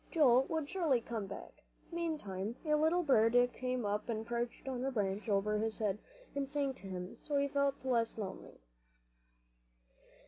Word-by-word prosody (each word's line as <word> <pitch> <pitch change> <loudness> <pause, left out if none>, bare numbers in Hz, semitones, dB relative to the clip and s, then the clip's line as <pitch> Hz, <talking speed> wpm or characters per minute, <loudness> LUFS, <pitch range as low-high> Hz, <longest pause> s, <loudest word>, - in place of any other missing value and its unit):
Joel 265 -6 +5
would 320 -3 -1
surely 315 -8 +2
come 225 -3 -4
back. 195 - -9 0.3
Meantime 235 - -2
a 305 - +2
little 320 +4 +3
bird 230 -5 +4 0.2
came 255 -2 -2
up 210 +3 -1
and 220 -1 -2
perched 235 +2 -3
on 255 -2 -2
the 270 - 0
branch 205 -3 -1
above 210 +1 +2
his 220 -1 -1
head, 210 -2 0 0.3
and 280 -1 -2
sang 280 -2 0
to 200 - -11
him, 180 -1 -5
so 290 -1 -1
he 280 0 +3
felt 280 -1 0
less 235 -3 +1
lonely. 195 - -6
245 Hz, 165 wpm, -35 LUFS, 210-280 Hz, 0.3 s, Joel